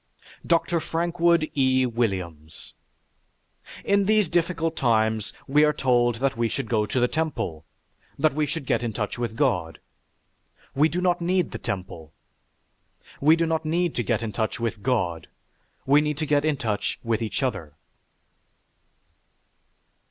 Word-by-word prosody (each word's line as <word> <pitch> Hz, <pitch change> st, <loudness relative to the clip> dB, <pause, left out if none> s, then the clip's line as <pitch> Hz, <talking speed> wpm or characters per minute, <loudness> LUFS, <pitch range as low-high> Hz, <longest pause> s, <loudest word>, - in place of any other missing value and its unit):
DR. 170 Hz, 0 st, +2 dB
FRANKWOOD 170 Hz, -1 st, +1 dB
E. 130 Hz, -2 st, +3 dB
WILLIAMS 95 Hz, -10 st, -3 dB, 1.1 s
In 200 Hz, 0 st, +3 dB
these 215 Hz, -2 st, +3 dB
difficult 165 Hz, -1 st, 0 dB
times 110 Hz, -3 st, +1 dB, 0.2 s
we 150 Hz, +2 st, +4 dB
are 150 Hz, 0 st, +4 dB
told 120 Hz, -4 st, +2 dB
that 135 Hz, +3 st, -1 dB
we 115 Hz, 0 st, +1 dB
should 110 Hz, -, -3 dB
go 110 Hz, -3 st, +1 dB
to 130 Hz, -, -1 dB
the 125 Hz, -, +3 dB
temple, 135 Hz, -, -3 dB, 0.5 s
that 155 Hz, +1 st, +2 dB
we 150 Hz, +1 st, 0 dB
should 155 Hz, -1 st, -4 dB
get -, -, +1 dB
in 115 Hz, -2 st, -3 dB
touch 105 Hz, +2 st, -3 dB
with 120 Hz, -2 st, -3 dB
God. 115 Hz, -, 0 dB, 1.0 s
We 150 Hz, +4 st, +3 dB
do 180 Hz, +3 st, -2 dB
not 180 Hz, -1 st, +1 dB
need 180 Hz, 0 st, +1 dB
the -, -, -6 dB
temple. 90 Hz, -8 st, -6 dB, 1.1 s
We 155 Hz, +3 st, +5 dB
do 165 Hz, 0 st, +1 dB
not 160 Hz, -1 st, -1 dB
need 170 Hz, +2 st, 0 dB
to -, -, -1 dB
get 115 Hz, +1 st, -1 dB
in 110 Hz, -, -3 dB
touch 110 Hz, +1 st, -2 dB
with 115 Hz, -3 st, -3 dB
"God." 95 Hz, -9 st, -1 dB, 0.6 s
We 145 Hz, +2 st, +5 dB
need 150 Hz, -1 st, -2 dB
to 155 Hz, -, -1 dB
get 145 Hz, 0 st, +2 dB
in 155 Hz, -2 st, +1 dB
touch 110 Hz, -5 st, -2 dB
with 115 Hz, -1 st, -1 dB
each 110 Hz, +4 st, -2 dB
other. 95 Hz, -, -3 dB
130 Hz, 150 wpm, -25 LUFS, 110-160 Hz, 1.1 s, We